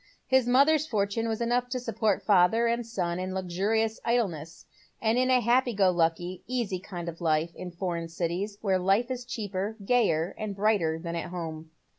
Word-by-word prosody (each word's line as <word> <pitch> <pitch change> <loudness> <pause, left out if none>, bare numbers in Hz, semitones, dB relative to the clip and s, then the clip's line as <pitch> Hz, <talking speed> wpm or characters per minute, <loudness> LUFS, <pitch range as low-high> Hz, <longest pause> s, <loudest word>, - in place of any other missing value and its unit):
His 260 -2 +3
mother's 285 +5 +4
fortune 215 -1 -1
was 225 0 -2
enough 245 +1 0
to 255 0 -2
support 220 -4 0
father 205 +4 +4
and 235 0 0
son 180 -6 -2
in 185 +1 -4
luxurious 205 +5 0
idle 235 -3 +2
ness, 160 0 -10 0.3
and 225 0 +1
in 255 +1 +2
a 255 -1 +4
happy 240 +1 +2
go 195 -2 +4
lucky, 175 +1 0
easy 235 -7 -2
kind 175 -2 -7
of 170 +1 -7
life 160 0 +1
in 185 - -7
foreign 170 -1 -3
cities, 180 +5 -3
where 190 -3 +1
life 195 +7 +2
is 250 -1 -4
cheaper, 205 -2 -4
gayer, 195 -8 +2
and 215 -2 -4
brighter 195 -6 +1
than 170 +1 -5
at 170 - -4
home. 160 -3 -6
200 Hz, 185 wpm, -28 LUFS, 175-235 Hz, 0.3 s, mother's